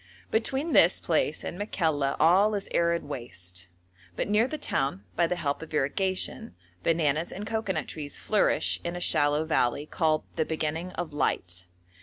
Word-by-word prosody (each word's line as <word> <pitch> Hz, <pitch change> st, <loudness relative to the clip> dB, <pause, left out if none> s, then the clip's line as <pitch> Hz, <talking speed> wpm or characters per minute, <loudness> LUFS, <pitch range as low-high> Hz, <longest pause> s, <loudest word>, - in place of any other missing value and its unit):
Between 265 Hz, +8 st, 0 dB
this -, -, +6 dB
place -, -, 0 dB
and 175 Hz, -, -5 dB
Makalla 160 Hz, -9 st, 0 dB
all 190 Hz, +7 st, +5 dB
is 200 Hz, -, -3 dB
arid 170 Hz, 0 st, +2 dB
waste, 95 Hz, -10 st, -6 dB, 0.5 s
but -, -, -1 dB
near 210 Hz, +4 st, +3 dB
the 310 Hz, -, -4 dB
town, 135 Hz, -, -1 dB
by 170 Hz, 0 st, +3 dB
the 180 Hz, -, -1 dB
help 145 Hz, -4 st, -2 dB
of 160 Hz, -1 st, -7 dB
irrigation, 185 Hz, -, -1 dB, 0.3 s
bananas 160 Hz, -1 st, +1 dB
and 205 Hz, +3 st, -6 dB
cocoanut 215 Hz, -8 st, -2 dB
trees 145 Hz, -2 st, -6 dB
flourish 210 Hz, -, +2 dB
in 170 Hz, 0 st, -3 dB
a -, -, -3 dB
shallow 150 Hz, -2 st, +2 dB
valley 145 Hz, -2 st, +1 dB
called 155 Hz, -1 st, +1 dB
'the 160 Hz, -, +2 dB
Beginning 160 Hz, +2 st, -2 dB
of 165 Hz, -4 st, -4 dB
Light.' 90 Hz, -10 st, -1 dB
160 Hz, 160 wpm, -28 LUFS, 145-185 Hz, 0.5 s, this